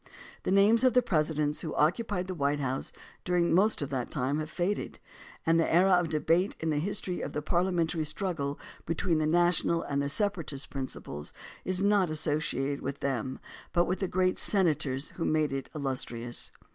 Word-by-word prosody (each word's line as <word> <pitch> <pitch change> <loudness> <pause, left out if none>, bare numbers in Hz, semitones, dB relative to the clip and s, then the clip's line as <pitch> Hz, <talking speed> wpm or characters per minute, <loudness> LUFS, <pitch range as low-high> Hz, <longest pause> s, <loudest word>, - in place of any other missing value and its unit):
The - - -2
names 205 +5 +5
of 255 -1 +4
the 250 - +5
Presidents 155 -2 0
who 160 - -3
occupied 180 +4 +1
the 185 - -4
White 145 -3 0
House 135 -1 -2 0.3
during 175 -2 +2
most 195 -2 +3
of 140 - -4
that 130 -3 -2
time 140 +1 -1
have 155 0 -4
faded, 185 +5 -2 0.5
and 165 0 +4
the 165 - +1
era 185 +4 +5
of 175 -2 +4
debate 165 +5 +1
in 160 -1 -1
the 150 - +1
history 185 +1 -2
of - - -5
the 150 - -2
parliamentary 170 -1 +1
struggle 155 -3 -2 0.3
between 165 0 +1
the 155 - +1
national 170 0 +3
and 140 0 -1
the 140 - -1
separatist 165 -6 -1
principles 130 - -6 0.3
is 185 +1 0
not 200 -3 +3
associated 150 -3 -1
with 140 +1 -5
them 130 -1 -2 0.3
but 175 0 +3
with 185 - -1
the 190 - 0
great 185 0 +1
senators 150 -8 +1
who 165 - -2
made 155 -2 +1
it 135 0 -4
illustrious. 125 -4 -3
160 Hz, 180 wpm, -29 LUFS, 140-180 Hz, 0.5 s, names